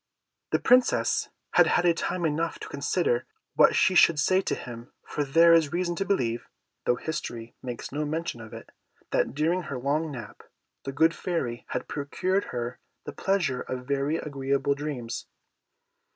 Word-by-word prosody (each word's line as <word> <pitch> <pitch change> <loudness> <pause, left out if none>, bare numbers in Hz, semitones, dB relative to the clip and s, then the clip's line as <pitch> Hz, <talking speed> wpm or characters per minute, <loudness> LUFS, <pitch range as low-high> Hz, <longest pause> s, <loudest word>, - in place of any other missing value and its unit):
The - - +3
Princess 250 0 +3 0.2
had - - +6
had 175 -1 +3
time 175 +1 -2
enough 160 +2 -1
to - - -6
consider 140 -3 0 0.3
what - - +5
she 190 - +4
should 170 -3 +6
say 185 +5 +3
to - - -1
him, 120 -1 -9
for 150 - -2
there 165 +4 +6
is 160 -3 +4
reason 175 0 -1
to 195 - -1
believe 120 -13 0 0.4
(though 125 - +3
history 120 -6 -5
makes 125 -2 -6
no 150 +2 -2
mention 155 -5 -3
of 110 -1 -10
it) - - -10 0.4
that, - - +1
during 165 +5 +1
her 140 - -3
long 145 +5 0
nap, 120 -6 -8 0.4
the 135 - -3
good 160 +4 +3
Fairy 130 -12 -3
had - - -3
procured 185 +7 -1
her 120 0 -4 0.3
the - - -6
pleasure 175 -10 0
of 125 0 -5
very 140 +3 0
agreeable 140 -1 0
dreams. 140 -5 -5
145 Hz, 165 wpm, -27 LUFS, 125-170 Hz, 0.4 s, had